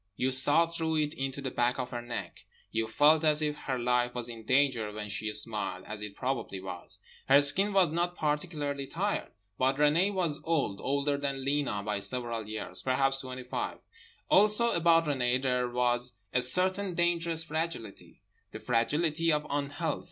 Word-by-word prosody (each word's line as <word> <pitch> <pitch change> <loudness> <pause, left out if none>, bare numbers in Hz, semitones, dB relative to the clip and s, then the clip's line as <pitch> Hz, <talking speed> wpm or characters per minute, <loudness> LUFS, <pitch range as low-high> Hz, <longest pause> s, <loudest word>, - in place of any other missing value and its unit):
You 130 +4 0
saw 145 +5 +7
through 165 -1 -2
it 150 0 0
into 135 -2 -4
the 130 - -3
back 120 +1 0
of 125 -1 -4
her 120 -1 -4
neck. 120 0 -7 0.3
You 115 0 -1
felt 150 +7 +4
as 155 0 +3
if 150 -1 -1
her 135 -3 -4
life 125 0 0
was 120 -1 -2
in 115 -2 -10
danger 130 -5 +2
when 105 0 -6
she 105 +2 -3
smiled, 105 -4 -2
as 105 0 -6
it 105 -1 -7
probably 120 -7 -3
was. 95 -2 -5 0.3
Her 140 +1 +7
skin 185 +9 +4
was 190 -5 +3
not 175 +2 -1
particularly 150 -2 -2
tired. 200 +7 -2 0.3
But 130 +1 +2
Renée 150 +7 +3
was 175 -6 -1
old, 140 -12 -1
older 140 +1 0
than 140 -2 -3
Lena 140 -8 -1
by 105 -1 -2
several 115 +1 -1
years; 110 0 -4
perhaps 135 +1 +1
twenty 130 -1 -7
five. 125 - -4 0.5
Also 210 +4 +4
about 165 -1 +3
Renée 130 -3 +1
there 125 -2 0
was 120 0 0 0.2
a 125 - +2
certain 185 +8 +3
dangerous 170 -1 +1
fragility, 160 -10 -5 0.3
the - - -9
fragility 155 +7 0
of 150 0 0
unhealth. 145 +2 -2
135 Hz, 175 wpm, -29 LUFS, 120-160 Hz, 0.5 s, saw